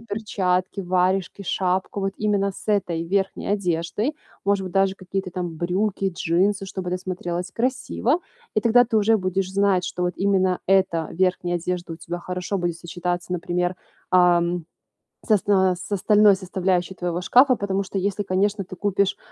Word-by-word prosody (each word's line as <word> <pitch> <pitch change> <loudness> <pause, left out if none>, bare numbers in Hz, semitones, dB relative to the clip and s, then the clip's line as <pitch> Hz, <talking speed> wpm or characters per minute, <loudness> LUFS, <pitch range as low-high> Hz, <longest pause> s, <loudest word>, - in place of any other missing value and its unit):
перчатки, 200 -4 -1
варежки, 185 +1 0
шапку 185 +1 -1
вот 195 0 -2
именно 200 -2 +1
с - - -12
этой 180 -6 +1
верхней 195 +2 -1
одеждой, 200 - -1 0.3
может 200 -1 +2
быть, 185 - -6
даже 195 -1 +2
какие-то 190 0 -4
там 175 -2 -5
брюки, 195 +3 0
джинсы, 190 +4 +1
чтобы 190 -1 -5
это 180 - 0
смотрелось 180 -1 -4
красиво. 260 +4 0 0.3
И 215 - +3
тогда 240 +1 +5
ты 225 - 0
уже 220 +1 +4
будешь 185 0 -1
знать, 195 -2 +2
что 180 - -3
вот 180 - -1
именно 190 -2 +2
эта 185 -4 +2
верхняя 180 0 +1
одежда 175 0 -3
у - - -6
тебя 175 +1 -6
хорошо 180 +2 -3
будет 175 -2 -2
сочетаться, 175 0 -4
например, 180 0 -1 0.3
ам, 175 -1 +3 0.6
с - - -3
оста 190 -3 +3
с 180 +3 -10
остальной 205 +1 +5
составляющей 185 -1 -1
твоего 175 -1 -3
шкафа. 255 +7 +5
Потому 200 -2 -1
что 195 - -5
если, 200 +1 -1
конечно, 195 +2 0
ты 185 - -10
купишь, 200 +1 0
190 Hz, 160 wpm, -23 LUFS, 180-200 Hz, 0.6 s, тогда